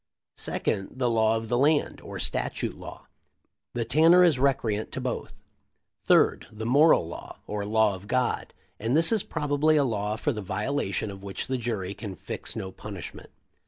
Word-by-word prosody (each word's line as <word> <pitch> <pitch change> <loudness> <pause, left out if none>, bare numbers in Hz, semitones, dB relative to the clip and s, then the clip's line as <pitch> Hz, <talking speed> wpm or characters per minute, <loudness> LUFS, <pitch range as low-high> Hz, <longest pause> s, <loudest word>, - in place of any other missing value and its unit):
Second, 95 +6 -2
the 125 -2 +1
law 110 -1 +3
of 110 0 -5
the 120 +2 +1
land, 150 +2 +2
or - - -8
statute - - -1
law, - - -10 0.7
and 115 -2 -1
Tanner 165 +7 +6
is 160 -7 +4
recreant 120 -6 0
to - - -3
both. - - -4 0.7
Third, - - +3
the 110 +1 -6
moral 140 - +5
law, 85 - -9
or 105 -1 -3
law 110 0 +3
of 95 +2 -9
God, 125 +1 0 0.3
and 115 +7 +1
this 165 +4 +5
is 220 -3 +3
probably 150 -1 +1
a 145 - +4
law 105 -4 -1
for 145 +6 -1
the 105 - -5
violation 105 0 -2
of 95 0 -10
which 100 -1 -4
the 130 0 -2
jury 105 -5 -3
can 100 -2 -7
fix - - -6
no 95 - -5
punishment." 100 -2 -9
115 Hz, 175 wpm, -27 LUFS, 105-140 Hz, 0.7 s, Tanner